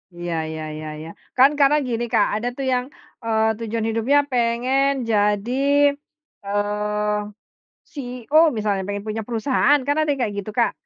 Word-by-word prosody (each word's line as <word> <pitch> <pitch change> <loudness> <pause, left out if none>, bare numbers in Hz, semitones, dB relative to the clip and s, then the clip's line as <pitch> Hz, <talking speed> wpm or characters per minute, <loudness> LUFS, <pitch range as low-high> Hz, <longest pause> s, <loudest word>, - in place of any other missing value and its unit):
Iya 175 0 -4 0.2
iya 160 0 -6
iya 155 0 -7
iya. 160 +1 -8 0.3
Kan 265 +2 +7
karena 285 +2 +5
gini, 235 0 -2
Kak. 205 - +4
Ada 225 +3 -2
tuh 270 - -3
yang, 250 0 0 0.4
eee, 220 -1 +1
tujuan 225 -1 -3
hidupnya 230 +6 +2
pengen 250 +3 +1 0.2
jadi, 210 +2 +1 0.9
eee, 210 +1 -1 0.8
CEO 250 -1 -4 0.2
misalnya, 205 -2 0
pengen 205 0 -4
punya 215 +1 -3
perusahaan. 260 +5 +2
Kan 285 +1 +1
ada 310 - 0
yang 275 -2 -1
kayak 205 -2 -4
gitu, 210 - -8
Kak. - - +2
225 Hz, 155 wpm, -22 LUFS, 210-255 Hz, 0.9 s, Kan